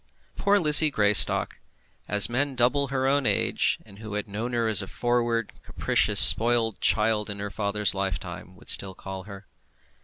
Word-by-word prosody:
Poor 200 +1 0
Lizzie 155 -3 +6
Greystock! 105 -6 +1 0.5
as 105 -2 +4
men 135 +3 -3
double 125 +3 0
her 130 0 -4
own 140 -1 -1
age, - - -1
and 100 - -18
who 110 -1 -9
had 105 0 -5
known 110 +5 -7
her 115 -1 -2
as 105 -2 +1
a 95 - -9
forward, 120 -1 -3
capricious, - - 0
spoilt 115 -1 +5
child 105 -1 -1
in 100 - -6
her 100 0 -7
father's 105 0 -1
lifetime, 95 -2 -7
would - - -5
still 95 -1 -2
call 95 -1 -10
her. 100 -1 -13
110 Hz, 165 wpm, -23 LUFS, 100-120 Hz, 0.5 s, Lizzie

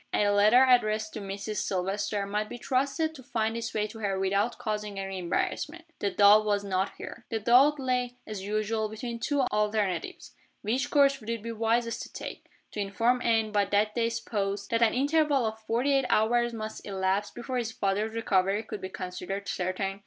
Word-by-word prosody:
A 205 - +3
letter 210 +5 +6
addressed 215 -4 +2
to 215 - -5
"Mrs. 200 +2 -5
Silvester" 200 +2 -1
might 210 +1 -2
be - - -6
trusted 280 +6 0
to 280 - -11
find 225 -4 -1
its 230 0 -3
way 210 -1 0
to 225 +1 -9
her 200 -3 -1
without 200 +4 0
causing 210 -2 -4
any 195 -1 -4
embarrassment. 300 - -2
The 200 - 0
doubt 205 +2 +6
was 205 -1 0
not 190 -1 -1
here. 235 - -9
The 225 - -1
doubt 265 +7 +5
lay, 250 -2 -1
as 215 -3 -6
usual, 215 +2 -1
between 235 +2 -5
two 285 +4 0
alternatives. 210 -7 -1 0.3
Which 240 +6 0
course 275 -1 +4
would 220 - -9
it 230 -2 -3
be 230 - -4
wisest 230 +1 0
to - - -8
take? - - -8 0.2
to - - -6
inform 230 +5 +1
Anne, 225 -2 +2
by 205 -1 +2
that 205 +2 +1
day's 230 0 0
post, 200 -3 -3
that 230 0 +1
an 230 0 +4
interval 285 -1 +2
of 220 0 -3
forty 235 +6 0
eight 270 -1 +2
hours 240 +2 +3
must 220 -1 -6
elapse 195 +1 -1
before 250 +1 -5
his 230 -2 -2
father's 210 +1 -1
recovery 195 -1 +1
could 210 - -7
be 190 - -5
considered 185 +2 -5
certain? 195 +2 -2
215 Hz, 190 wpm, -28 LUFS, 200-240 Hz, 0.3 s, letter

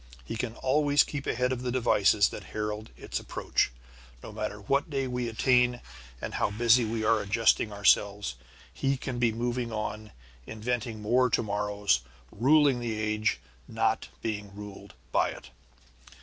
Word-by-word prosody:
He - - -5
can 115 0 -3
always 145 +2 +3
keep 145 -2 -6
ahead 125 +2 0
of 125 -1 -2
the 125 -1 -2
devices 105 -5 +3
that - - -8
herald 105 0 -3
its - - -4
approach. - - -1 0.5
No - - -8
matter 105 - -4
what 140 +10 0
day 135 -2 -1
we 125 -2 -2
attain 125 +1 +3 0.4
and - - -5
how - - +1
busy 115 +3 +4
we 110 0 -2
are 110 0 +3
adjusting 105 +1 +2
ourselves, 100 -5 +2 0.4
he 135 0 0
can 130 -1 -4
be 120 -2 +3
moving 120 +1 -2
on, 110 0 -4 0.4
inventing 115 0 -3
more 125 +4 +3
to 115 - +1
morrows; 105 - 0 0.3
ruling 140 +2 +4
the 115 -3 -3
age, 110 0 0 0.3
not - - 0 0.2
being 105 -3 -4
ruled 105 -1 -10 0.2
by - - +2
it. - - -10
115 Hz, 155 wpm, -28 LUFS, 105-125 Hz, 0.5 s, busy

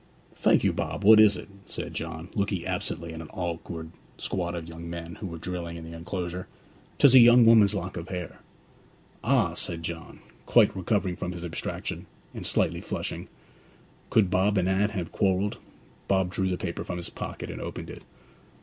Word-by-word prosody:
'Thank - - +3
you, - - +3
Bob; - - -3
what 110 +2 +9
is 105 -3 +6
it?' - - -9 0.2
said - - -6
John, 80 +3 -5
looking 100 -4 -1
absently 90 -3 -3
at 80 - -6
an 75 - -10
awkward 85 -2 -5 0.3
squad 85 -2 -2
of 85 -1 -5
young 85 0 -8
men 85 0 -6
who 100 - -4
were 85 -2 -6
drilling 85 0 -5
in 85 - -8
the 85 0 -8
enclosure. 90 +1 -4 0.5
''Tis 140 -3 +7
a 130 - +10
young 120 0 +8
woman's 110 -4 +6
lock 90 +1 -4
of 85 +1 -6
hair.' 90 -2 -5 0.8
'Ah!' - - +3
said 85 -1 -2
John, 80 0 -6 0.3
quite - - +5
recovering 95 -1 0
from 90 - -3
his 85 -1 -6
abstraction, 85 - -4 0.3
and - - -5
slightly - - +1
flushing. - - -4 0.8
Could 100 -5 +3
Bob 100 +2 +3
and 90 -1 +2
Anne 95 +2 +2
have 90 -6 -4
quarrelled? 100 0 +1 0.5
Bob 95 -2 +2
drew 95 0 0
the 90 - -1
paper 85 -2 -4
from 90 - -4
his 85 - -6
pocket, - - -6
and - - -7
opened - - -6
it. - - -10
90 Hz, 185 wpm, -27 LUFS, 85-100 Hz, 0.8 s, a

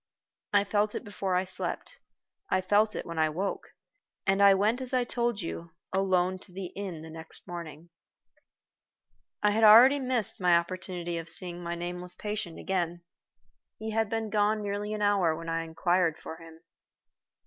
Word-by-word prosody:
I 205 -1 +4
felt 205 +1 0
it - - -4
before 195 -2 -2
I 180 - +2
slept; 190 - -4 0.5
I 185 - +2
felt 205 +3 +2
it - - -4
when 165 -2 -5
I 155 0 +3
woke; 190 +6 -4 0.5
and 195 0 +2
I 200 -1 +8
went 215 +6 +1
as 255 0 +1
I 250 - +3
told 240 -2 -1
you, 165 0 -6 0.2
alone 185 -1 +1
to 185 - -12
the 185 -1 -7
inn 185 -6 -5
the 160 - -9
next 160 0 -11
morning. 170 -1 -8 1.5
I 210 - +5
had 225 +6 +7
missed 255 -4 -1
my 180 -2 +4
only - - +6
opportunity 175 -1 -4
of 165 - -5
seeing 175 -2 +1
my 170 0 -3
nameless 180 +1 -6
patient 210 -5 -4
again. 175 -2 -2 0.7
He 220 0 -5
had 220 -1 0
been 225 -1 -2
gone 210 0 +2
nearly 205 +1 -3
an 210 - -2
hour 195 -6 +3
when 165 +1 -7
I 165 0 0
inquired 170 0 +1
for 160 - -8
him. 165 -1 -14
185 Hz, 170 wpm, -29 LUFS, 170-210 Hz, 1.5 s, I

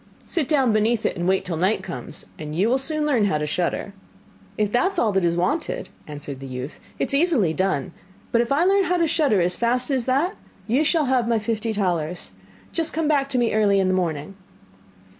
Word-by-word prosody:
Sit 325 -7 -1
down 270 -7 +3
beneath 220 +1 +1
it, - - 0
and 175 -1 -2
wait 190 0 +1
till 170 -3 -3
night 190 +6 +1
comes, - - -6
and 150 -1 -6
you 190 +6 +2
will 260 +2 +2
soon 305 +2 -1
learn 250 -8 +2
how 175 -7 +1
to 150 - -2
shudder.' 175 +5 -2 0.6
'If 210 -1 0
that 365 - +2
is - - -6
all 225 -9 +2
that 190 -2 +1
is 170 0 +1
wanted,' 320 - -1 0.2
answered 145 -2 -7
the 135 - -8
youth, 130 +3 -6 0.2
'it - - -1
is - - -3
easily 275 - +3
done; 185 -7 -1 0.4
but 235 - +4
if 235 - -3
I 290 +5 +3
learn 390 0 +4
how 360 0 +1
to 335 -1 +2
shudder 280 - +2
as 175 +1 +3
fast 250 +3 +1
as 260 -3 +1
that, 285 +10 +1 0.3
you 255 +7 +2
shall 315 0 +2
have 255 -3 +1
my 235 -1 +2
fifty 225 +1 -2
talers. 180 -5 -2 0.4
Just 330 -1 -2
come 320 -1 0
back 280 -2 +2
to 265 - -1
me 240 -2 +1
early 205 -2 +3
in 190 -1 +2
the - - +2
morning. 170 -2 -2
225 Hz, 225 wpm, -23 LUFS, 180-280 Hz, 0.6 s, but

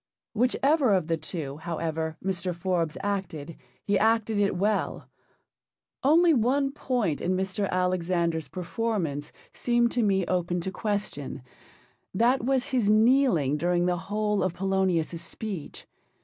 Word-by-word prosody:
Whichever 255 +1 +3
of 180 -4 0
the 165 0 0
two, 155 -3 -5
however, 160 -1 -3
Mr. 180 -2 -1
Forbes 170 -3 -1
acted, 185 -6 -3 0.3
he 200 -1 +1
acted 220 -1 +2
it 200 -2 +2
well. 205 +3 -1 1.0
Only 325 +4 +5
one 270 +3 +2
point 245 - -1
in 185 +1 0
Mr. 190 +1 -1
Alexander's 175 -3 0
performance 180 -6 -3 0.2
seemed 240 -1 +1
to 245 - +1
me 195 -4 +2
open 175 -1 -1
to 190 - -4
question, 200 - -3 0.7
that 240 +5 +3
was 260 0 +1
his 245 -6 +1
kneeling 215 - +4
during 175 +2 +1
the 180 0 +2
whole 210 0 0
of 185 -2 -1
Polonius's 185 -3 0
speech. 190 -2 -5
190 Hz, 130 wpm, -27 LUFS, 170-225 Hz, 1.0 s, Only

